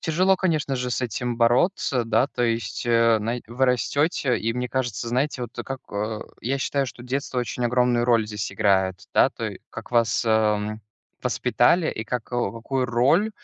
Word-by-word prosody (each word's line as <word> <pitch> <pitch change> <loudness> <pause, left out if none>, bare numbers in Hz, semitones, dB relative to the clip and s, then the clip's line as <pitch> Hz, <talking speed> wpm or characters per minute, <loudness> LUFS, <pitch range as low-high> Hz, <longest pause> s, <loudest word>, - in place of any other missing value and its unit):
Тяжело, 185 +4 +2
конечно 155 -7 0
же, 125 0 -3
с - - -1
этим 125 0 -2
бороться, 125 +2 +2
да. 120 +3 +2
То 120 - -4
есть, 115 -1 -1
э, 115 -1 +4
знае 115 +3 -3
вы 125 +4 0
растете, 130 +1 +1
и 115 +1 -1
мне 125 +1 -3
кажется, 120 -3 -2
знаете, 130 +2 -1
вот 120 -1 -7
как 135 -1 -5
а, 105 +1 -3 0.2
я 135 +4 -1
считаю, 140 0 0
что 120 - -9
детство 130 +1 -3
очень 120 0 -2
огромную 120 0 +2
роль 115 -3 +3
здесь 105 -2 -4
играет, 95 -1 +1
да. - - +5
То - - -5
й - - -10
как - - -9
вас, 115 -1 +2
ам, 110 -1 +1 0.4
воспитали 170 -2 +2
и 110 - -5
как 125 +1 -4
э, 120 0 0
какую 125 +3 -2
роль, 135 - +3
120 Hz, 185 wpm, -24 LUFS, 115-130 Hz, 0.4 s, да